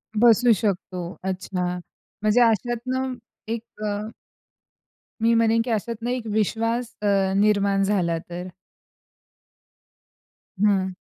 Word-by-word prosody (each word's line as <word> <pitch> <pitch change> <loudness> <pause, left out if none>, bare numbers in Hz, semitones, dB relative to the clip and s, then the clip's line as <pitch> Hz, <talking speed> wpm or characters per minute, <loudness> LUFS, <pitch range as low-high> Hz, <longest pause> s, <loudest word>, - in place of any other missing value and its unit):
बसू 235 +2 +5
शकतो. 185 -2 -3
अच्छा! 185 -1 -3 0.6
म्हणजे 215 +3 +4
अशातनं 240 +3 +1 0.3
एक 225 0 -3 0.2
अ 210 +1 -2 1.1
मी 230 +1 +4
म्हणेन 230 0 +3
की - - -4
अशातनं 230 +2 -2
एक 250 -2 -2
विश्वास 230 +3 0
अ, 210 - 0 0.3
निर्माण 200 -1 +3
झाला 180 -5 +1
तर. 175 +1 -5 2.1
हं. 195 -3 +3
215 Hz, 100 wpm, -24 LUFS, 195-230 Hz, 2.1 s, बसू